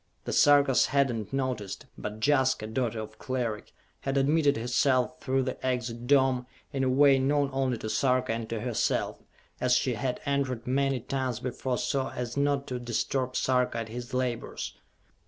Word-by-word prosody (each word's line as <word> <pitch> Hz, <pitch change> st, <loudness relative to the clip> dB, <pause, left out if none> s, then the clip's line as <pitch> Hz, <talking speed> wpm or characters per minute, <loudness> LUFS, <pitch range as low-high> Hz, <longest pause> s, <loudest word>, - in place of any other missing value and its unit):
The -, -, -3 dB
Sarkas 145 Hz, -2 st, +5 dB
had 140 Hz, 0 st, +2 dB
not 110 Hz, -3 st, -5 dB
noticed, 130 Hz, -7 st, -3 dB
but 105 Hz, +1 st, -6 dB
Jaska, 130 Hz, -5 st, +2 dB
daughter 115 Hz, 0 st, -2 dB
of 110 Hz, 0 st, -8 dB
Cleric, 120 Hz, -5 st, -3 dB, 0.3 s
had 135 Hz, 0 st, -2 dB
admitted 145 Hz, +1 st, +3 dB
herself 125 Hz, +5 st, +1 dB
through 135 Hz, 0 st, 0 dB
the 130 Hz, -, -5 dB
Exit 120 Hz, -2 st, -2 dB
Dome, 130 Hz, -2 st, +3 dB, 0.3 s
in 135 Hz, -1 st, 0 dB
a 130 Hz, -, +2 dB
way 135 Hz, +1 st, +5 dB
known 140 Hz, +1 st, +1 dB
only 130 Hz, -2 st, 0 dB
to 110 Hz, -, -6 dB
Sarka 125 Hz, +2 st, +1 dB
and 115 Hz, -1 st, -4 dB
to 115 Hz, -2 st, -3 dB
herself, 120 Hz, -3 st, -1 dB, 0.4 s
as 125 Hz, 0 st, +3 dB
she 125 Hz, 0 st, +1 dB
had 125 Hz, +3 st, -2 dB
entered 135 Hz, -4 st, -1 dB
many 135 Hz, 0 st, +1 dB
times 130 Hz, -1 st, -2 dB
before 125 Hz, 0 st, -2 dB
so 135 Hz, -1 st, -1 dB
as 120 Hz, -1 st, -5 dB
not 140 Hz, 0 st, +1 dB
to 125 Hz, -1 st, -4 dB
disturb 125 Hz, +2 st, -2 dB
Sarka 125 Hz, -2 st, +1 dB
at 115 Hz, -1 st, -4 dB
his 120 Hz, +1 st, -7 dB
labors. 125 Hz, -2 st, -3 dB
130 Hz, 170 wpm, -28 LUFS, 120-135 Hz, 0.4 s, Sarkas